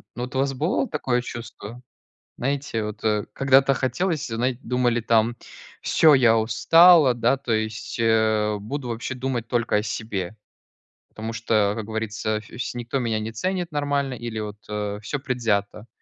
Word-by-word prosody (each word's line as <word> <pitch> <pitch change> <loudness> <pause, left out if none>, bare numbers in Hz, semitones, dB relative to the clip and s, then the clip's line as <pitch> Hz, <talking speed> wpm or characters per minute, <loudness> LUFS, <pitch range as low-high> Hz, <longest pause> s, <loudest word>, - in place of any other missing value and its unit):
Ну 120 - -4
вот 125 +2 -7
у - - +1
вас 135 0 +1
бывало 160 - 0
такое 130 - -1
чувство? 115 -1 -8 0.6
Знаете 135 -4 -2
вот, 105 0 -6
э, 105 -1 +1
когда-то 135 0 +4
хотелось 160 +4 -1
знает 120 +2 -2
думали 120 -1 0
там: 115 +1 +2 0.5
"Всё, 155 -2 +5
я 120 -4 +5
устала, 155 +6 +6
да, 120 +2 +2
то 130 -3 -5
есть, 110 0 -2
э, 110 -2 +2
буду 125 +5 -5
вообще 120 +3 -4
думать 125 -3 -3
только 120 -3 +1
о 105 - 0
себе, 105 -2 -4 0.7
потому 110 +1 -6
что, 110 -3 +1
как 110 -2 -5
говорится, 110 -1 -2
вс 120 +4 -6
никто 120 +2 -3
меня 115 -3 -1
не 110 +1 -5
ценит 180 - -2
нормально 145 -2 -1
или 120 -2 -5
вот, 105 -1 -6
э, 105 -1 -3
всё 130 +7 -4
предвзято". 115 -5 -1
115 Hz, 160 wpm, -24 LUFS, 110-135 Hz, 0.7 s, устала